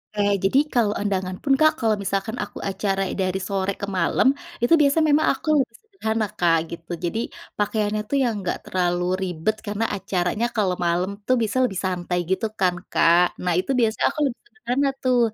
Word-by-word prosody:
Oke, 205 - 0 0.2
jadi 195 +8 +3 0.2
kalau 220 -4 +2
undangan 185 -2 -2
pun 275 - +2
Kak, 310 0 +6
kalau 225 -2 +2
misalkan 195 +3 -2
aku - - -9
acara 195 0 -1 0.2
dari 185 0 0
sore 195 0 -1
ke - - -1
malam, 170 +8 +2 0.3
itu 240 +8 +3
biasanya 295 +3 +3
memang 310 +2 +3
aku - - -15
lebih 255 - -3
sederhana 225 - -2
Kak 170 -2 +4
gitu. 170 +1 -9
Jadi 220 +6 -1 0.4
pakaiannya 210 0 0
tuh 280 - +1
yang 235 -2 +1
enggak 185 - -2
terlalu 175 -1 0 0.2
ribet 180 +3 -1
karena 210 +2 -1
acaranya 190 +3 -1
kalau 195 -4 +1
malam 175 +3 +1 0.2
tuh 255 - +4
bisa 220 +4 -2
lebih 195 -7 -1
santai 180 -1 -2
gitu 225 +4 +1
kan, 180 -2 +2 0.2
Kak. 170 +1 +5 0.2
Nah 180 -1 +1
itu 230 - -2
biasanya 225 -2 +1
aku - - -6
lebih 250 -3 -3
sederhana 280 - -1
tuh. 255 -1 +3
205 Hz, 185 wpm, -23 LUFS, 185-235 Hz, 0.4 s, Kak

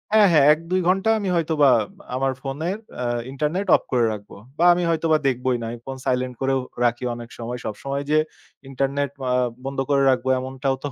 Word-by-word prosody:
হ্যাঁ, 215 -2 +7
হ্যাঁ, 150 -4 +5
১-২ 165 +4 -2
ঘন্টা 190 +4 +2
আমি 200 -2 -2
হয়তোবা 155 -4 +3 0.5
আমার 135 +1 0
ফোনের 155 +9 -3 0.2
অ্যা 125 - -3 0.3
ইন্টারনেট 155 +8 -2
অফ - - +1
করে 125 -3 +3
রাখবো। 105 -1 -10 0.2
বা 170 - +1
আমি 175 0 -1
হয়তোবা 160 -1 +2
দেখবোই 125 -1 0
না, - - -4
আমি 120 - -7
ফোন 135 0 -6
সাইলেন্ট 125 0 0
করেও 135 0 +1 0.3
রাখি 120 +1 0
অনেক 120 0 -9
সময়। 120 +1 -5
সবসময় 140 +6 -4
যে, 155 - +5 0.5
ইন্টারনেট 140 +1 -1 0.2
আ - - +2 0.3
বন্ধ 135 0 -4
করে 140 -1 +3
রাখবো 130 0 +1
এমনটাও 135 +1 -2
তো - - -1
135 Hz, 185 wpm, -23 LUFS, 130-160 Hz, 0.5 s, হ্যাঁ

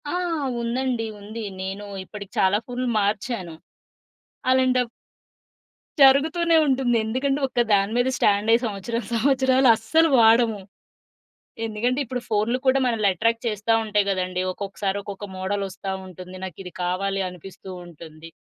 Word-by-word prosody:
ఆ! - - -3 0.5
ఉందండి. 240 0 -1
ఉంది. 215 +3 -7 0.2
నేను 195 +2 -5 0.2
ఇప్పటికి 200 0 -10
చాలా 190 +2 +4
ఫోనులు 250 0 -3
మార్చాను. 200 -3 -2 1.0
అలాంటప్ 255 -1 +3 1.1
జరుగుతూనే 315 +5 +5
ఉంటుంది. 255 -3 +2
ఎందుకంటే, 270 +5 0
ఒకదాని 215 -5 +2
మీద 245 +1 +2
స్టాండ్ 205 +1 +2
అయ్యి 230 +1 +5
సంవత్సరం 225 +2 -3
సంవత్సరాలు 260 +1 +3
అస్సలు 320 +9 +2
వాడము. 225 -1 +5 1.1
ఎందుకంటే, 230 +4 -1
ఇప్పుడు 250 0 -4
ఫోనులు 220 +3 +1
కూడా 260 +1 +4
మనల‌ని 225 -4 +2
అట్రాక్ట్ 230 +6 0
చేస్తవుంటాయి 215 -1 +1
కదండీ. 185 -1 -1
ఒక్కొక్కసారి 195 0 -3
ఒక్కొక్క 200 0 -7
మోడలొస్తావుంటుంది. 190 -1 -5
నాకు 185 -3 -8
ఇది 180 -2 -9
కావాలి 195 +2 -1
అనిపిస్తూవుంటుంది. 175 -3 -11
215 Hz, 115 wpm, -23 LUFS, 195-250 Hz, 1.1 s, జరుగుతూనే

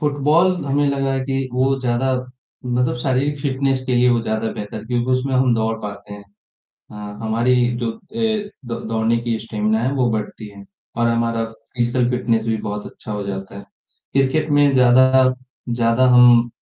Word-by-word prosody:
Football 150 +5 +2
हमें 145 +1 +1
लगा 135 -1 -1
है 135 - -1
कि 135 -1 -2
वो 135 +2 +1
ज़्यादा 125 +1 0 0.5
मतलब 125 0 0
शारीरिक 140 +3 0
फ़िटनेस 135 -1 -1
के 125 - 0
लिए 125 +1 +4
वो 120 -1 +2
ज़्यादा 110 0 -2
बेहतर 105 +1 -7
क्योंकि 120 +1 -1
उसमें 130 +1 0
हम 130 -2 +3
दौड़ 110 0 -1
पाते 100 0 -8
हैं। 100 0 -12 0.7
हाँ, 105 -1 -8
हमारी 115 +3 +1 0.2
जो 120 -2 -2 0.2
ए, 220 -2 -1 0.2
द 115 0 -4
दौड़ने 115 +1 +1
की 115 -1 -2
स्टेमिना 110 0 -1
है 130 +3 0
वो 125 -3 +1
बढ़ती 110 0 -4
है 100 0 -13 0.3
और 115 0 +2
हमारा 115 -1 0 0.3
फिज़िकल 120 0 +1
फ़िटनेस 115 -2 0
भी 110 -1 0
बहुत 105 0 -5
अच्छा 110 - -9
हो 105 -1 -3
जाता 95 0 -6
है। 100 - -10 0.5
क्रिकेट 135 +3 +1
में 145 -1 +4
ज़्यादा 130 +1 +5 0.3
ज़्यादा 120 +1 +2
हम 120 -1 +6
120 Hz, 175 wpm, -20 LUFS, 115-135 Hz, 0.7 s, हम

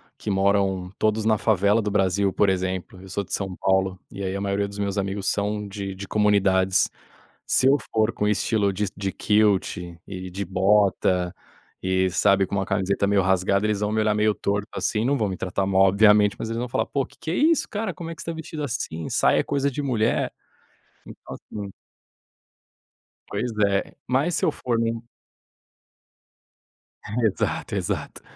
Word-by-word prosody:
que - - -6
moram 95 -2 +1
todos 110 0 +1
na 110 -2 +3
favela 105 +1 +3
do 105 - -2
Brasil, 95 -1 +1
por 100 +1 +2
exemplo, 95 0 -3
eu 95 - -12
sou 100 +2 -2
de - - -8
São 95 -2 -2
Paulo, 95 0 +1
e 100 - -6
aí 95 0 -2
a - - -2
maioria 100 0 0
dos 100 - -10
meus 100 0 -1
amigos 95 0 -2
são 105 0 -1
de 100 -1 -5
de 100 +1 -8
comunidades. 95 -3 +3 0.6
Se 130 - +3
eu 140 - +5 0.2
for 110 0 +2
com 105 - -1
estilo 105 -1 +1
de 105 +2 -1
de 100 -1 -2
kilt 105 -2 +2 0.3
e 95 -1 -7
de 100 +2 -3
bota 95 -1 +2 0.5
e 95 0 +1
sabe 95 +1 +3
com - - -4
uma 95 -1 0
camiseta 95 +1 0
meio 100 0 +3
rasgada, 95 +2 +2
eles 105 -1 -1
vão 105 0 0
me 110 0 +1
olhar 110 -1 +2
meio 105 0 +2
torto 100 +1 -2
assim 110 +1 -1
não 140 +3 +2
vão 110 -6 0
me 95 - -4
tratar 95 +1 -2
mal 95 0 +3
obviamente, 105 +1 +5
mas 110 - -4
eles 115 - -3
vão 120 +1 -2
falar: 120 - -1
"Pô 140 -2 -1
que - - -22
que - - -6
é 170 - 0
isso 320 - +3
cara, 210 -2 -3
Como 170 -2 -7
é 165 - -6
que 165 - -10
você 165 - -3
está - - -5
vestido 160 -1 -6
assim? 100 - -4
Saia - - +3
é - - -5
coisa 140 0 0
de 145 +2 -4
mulher". 115 -4 0 0.7
Então - - -10
assim. 100 -2 -8 1.5
Pois 120 0 -3
é, 100 -1 -1
mas 140 +7 +1
se - - +1
eu - - +3
for 120 -2 -2
em 115 0 0
um 115 - -7 2.2
Exato 110 -4 -1
exato. - - -3
100 Hz, 190 wpm, -24 LUFS, 95-110 Hz, 2.2 s, eu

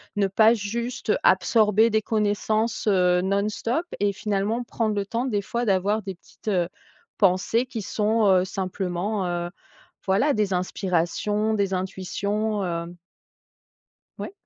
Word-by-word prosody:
ne 200 -1 +2
pas 220 +4 +5
juste 235 +2 -3
absorber 215 +3 +4
des 220 -1 +1
connaissances, 215 +1 0
heu, 180 -2 +3
non-stop 210 - -1
et 205 0 +1
finalement 210 +4 -1
prendre 225 -2 -1
le 200 -1 -1
temps 235 +4 -2
des 210 -6 0
fois 235 +5 -3
d'avoir 200 +1 +1
des 195 -1 -5
petites, 180 - -22
heu, 175 -3 +1 0.5
pensées 195 +5 +2
qui 235 -4 -5
sont, 215 +2 +1
heu, 185 -1 +4
simplement, 190 +1 -2
heu, 175 0 -2 0.6
voilà, 210 +10 +2
des 210 -4 0
inspirations, 185 +4 0
des 200 -2 0
intuitions, 200 +3 -2
hem 170 0 -4 1.2
Ouais? - - -6
205 Hz, 135 wpm, -24 LUFS, 185-220 Hz, 1.2 s, pas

